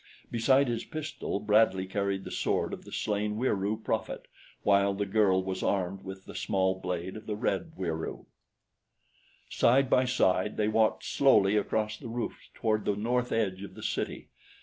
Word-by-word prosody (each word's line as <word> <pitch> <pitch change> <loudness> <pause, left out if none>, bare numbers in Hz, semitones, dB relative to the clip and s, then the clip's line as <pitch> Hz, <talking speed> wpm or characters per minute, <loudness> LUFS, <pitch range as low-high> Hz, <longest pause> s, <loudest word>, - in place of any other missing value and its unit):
Besides 130 +4 +3
his 120 -1 -2
pistol 155 -9 -4
Bradley 105 -2 +3
carried 100 0 -2
the - - -8
sword - - 0
of - - -8
the - - -11
slain 105 0 -1
Wieroo 105 -3 0
prophet, - - -3 0.4
while 100 0 +3
the 100 +1 -1
girl 95 -2 +3
was 95 0 -3
armed 95 -1 -1
with 95 0 -8
the - - -10
small 95 -1 +1
blade 90 +1 -4
of 110 0 -10
the 105 - -2
red 160 +9 -2
Wieroo. 80 -3 -4 1.2
Side 130 +2 +3
by 130 - +5
side 105 -5 +1
they 105 - +2
walked 110 0 +2
slowly 105 -7 +4
across 105 +1 0
the - - -9
roofs 120 +1 -5
toward 110 -1 0
the 105 - +1
north 120 +4 0
edge 95 -4 0
of 100 - -9
the - - -10
city. - - -3
105 Hz, 170 wpm, -29 LUFS, 95-115 Hz, 1.2 s, by